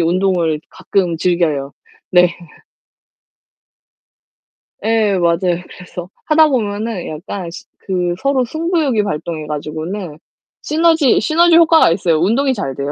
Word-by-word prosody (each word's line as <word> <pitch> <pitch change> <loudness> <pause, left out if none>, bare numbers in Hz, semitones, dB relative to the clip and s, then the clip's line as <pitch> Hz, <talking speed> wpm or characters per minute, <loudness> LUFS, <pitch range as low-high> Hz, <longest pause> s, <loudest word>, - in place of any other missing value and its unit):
운동을 170 -2 +1
가끔 180 -4 -1
즐겨요. 160 -6 0 0.4
네. 180 -1 +5 2.6
예 220 -3 +2
맞아요. 175 0 +1 0.2
그래서 180 0 -9 0.2
하다 310 0 +5
보면은 215 -5 -2
약간 170 +3 -6
시 - - -10 0.2
그 180 -2 -1
서로 275 -2 +1
승부욕이 315 - 0
발동해 160 -4 -4
가지고는 155 +3 -5 0.4
시너지, 320 -3 +3
시너지 330 +7 +4
효과가 325 - +5
있어요. 170 -2 +1
운동이 260 +9 +2
잘 195 - -4
돼요. 140 +2 -3
185 Hz, 260 characters per minute, -17 LUFS, 170-255 Hz, 2.6 s, 네